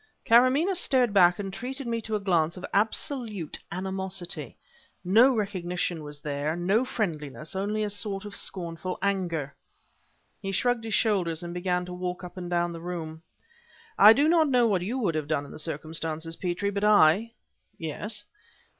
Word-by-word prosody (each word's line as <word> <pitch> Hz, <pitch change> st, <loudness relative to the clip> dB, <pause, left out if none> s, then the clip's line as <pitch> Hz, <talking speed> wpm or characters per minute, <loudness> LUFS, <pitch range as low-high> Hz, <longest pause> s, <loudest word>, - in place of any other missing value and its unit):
"Karamaneh 255 Hz, +10 st, +5 dB
started 255 Hz, -, +2 dB
back 180 Hz, -3 st, +6 dB
and 195 Hz, -2 st, -5 dB
treated 260 Hz, +6 st, -5 dB
me 230 Hz, -1 st, -2 dB
to 220 Hz, 0 st, -3 dB
a -, -, 0 dB
glance 170 Hz, -4 st, +1 dB
of 180 Hz, -, -6 dB
absolute 215 Hz, -, -1 dB
animosity. 190 Hz, -1 st, -4 dB, 0.5 s
No 230 Hz, +8 st, +6 dB
recognition 180 Hz, -5 st, -2 dB
was 145 Hz, -1 st, -7 dB
there, 145 Hz, +1 st, -2 dB
and 175 Hz, +1 st, -4 dB
no 210 Hz, +6 st, +3 dB
friendliness 160 Hz, -, -4 dB
only 210 Hz, +3 st, -1 dB
a 210 Hz, -, -1 dB
sort 205 Hz, -1 st, -3 dB
of 205 Hz, -1 st, -7 dB
scornful 180 Hz, -1 st, -3 dB
anger." 175 Hz, -8 st, -1 dB, 0.9 s
He 195 Hz, -, -3 dB
shrugged 235 Hz, +3 st, 0 dB
his 220 Hz, -, 0 dB
shoulders 180 Hz, -7 st, +1 dB
and 175 Hz, 0 st, -6 dB
began 180 Hz, 0 st, -1 dB
to 180 Hz, -, -7 dB
walk 180 Hz, +1 st, -4 dB
up 180 Hz, -, -9 dB
and 180 Hz, -2 st, -6 dB
down 175 Hz, -1 st, 0 dB
the 165 Hz, -, -8 dB
room. 165 Hz, -2 st, -6 dB, 0.7 s
"I 210 Hz, -, +9 dB
do 285 Hz, +5 st, +3 dB
not 320 Hz, -2 st, +4 dB
know 250 Hz, -2 st, +4 dB
what 200 Hz, -5 st, +2 dB
you 220 Hz, +9 st, -2 dB
would 205 Hz, -10 st, 0 dB
have 155 Hz, -2 st, -2 dB
done 150 Hz, -2 st, -1 dB
in -, -, -12 dB
the -, -, -8 dB
circumstances, 160 Hz, +1 st, -3 dB
Petrie, 180 Hz, +3 st, -2 dB
but 200 Hz, 0 st, -3 dB
I 210 Hz, +2 st, +5 dB, 0.2 s
" -, -, -48 dB
"Yes?" 205 Hz, +7 st, -5 dB
190 Hz, 175 wpm, -27 LUFS, 170-215 Hz, 0.9 s, I